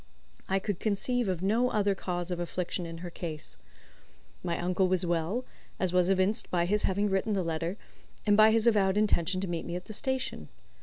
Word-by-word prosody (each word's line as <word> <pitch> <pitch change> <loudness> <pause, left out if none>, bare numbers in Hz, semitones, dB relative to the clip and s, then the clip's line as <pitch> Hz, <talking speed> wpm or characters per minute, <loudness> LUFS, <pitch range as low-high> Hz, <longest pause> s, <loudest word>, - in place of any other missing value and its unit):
I 190 - +2
could 195 -1 -2
conceive 230 +3 0
of 180 -1 -2
no 230 +6 +2
other 205 -3 +2
cause 180 -2 -4
of 175 - -2
affliction 175 0 -3
in 165 0 -7
her 175 - -6
case. 160 -3 -7 0.8
My 170 -2 -1
uncle 185 +2 +1
was 185 0 +1
well, 175 +8 -1 0.3
as 185 -2 0
was 180 0 +3
evinced 195 +2 +2
by 175 -1 +1
his 210 +4 +2
having 200 +2 +1
written 195 +2 0
the 190 -2 0
letter, 165 +3 -2 0.5
and 205 -1 +5
by 215 +1 +7
his 220 0 +3
avowed 205 -4 +3
intention 185 -3 +2
to 195 - -2
meet 170 -2 -3
me 170 - -5
at 180 - -5
the 215 - -8
station. 260 - -2
190 Hz, 200 wpm, -29 LUFS, 175-210 Hz, 0.8 s, by